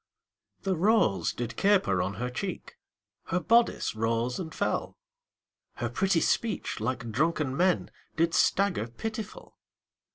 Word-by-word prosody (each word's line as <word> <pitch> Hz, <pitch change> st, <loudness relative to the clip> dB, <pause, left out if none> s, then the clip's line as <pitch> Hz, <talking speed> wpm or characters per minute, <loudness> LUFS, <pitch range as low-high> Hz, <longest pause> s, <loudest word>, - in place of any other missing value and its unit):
The 190 Hz, -1 st, 0 dB
rose 175 Hz, -, +2 dB
did 120 Hz, -1 st, -5 dB
caper 190 Hz, -, +3 dB
on 100 Hz, -, -2 dB
her 125 Hz, +1 st, -3 dB
cheek, 185 Hz, +9 st, -5 dB, 0.5 s
Her 180 Hz, -, 0 dB
bodice 235 Hz, +5 st, +2 dB
rose 115 Hz, +2 st, -1 dB
and 165 Hz, -3 st, -5 dB
fell, -, -, -2 dB, 0.8 s
Her -, -, -3 dB
pretty 190 Hz, -3 st, +1 dB
speech, 225 Hz, -, 0 dB
like 120 Hz, +1 st, -3 dB
drunken 150 Hz, +1 st, 0 dB
men, 180 Hz, +3 st, +1 dB, 0.2 s
Did 165 Hz, +1 st, +1 dB
stagger 195 Hz, -, +2 dB
pitiful. 215 Hz, -, -7 dB
165 Hz, 125 wpm, -28 LUFS, 120-195 Hz, 0.8 s, caper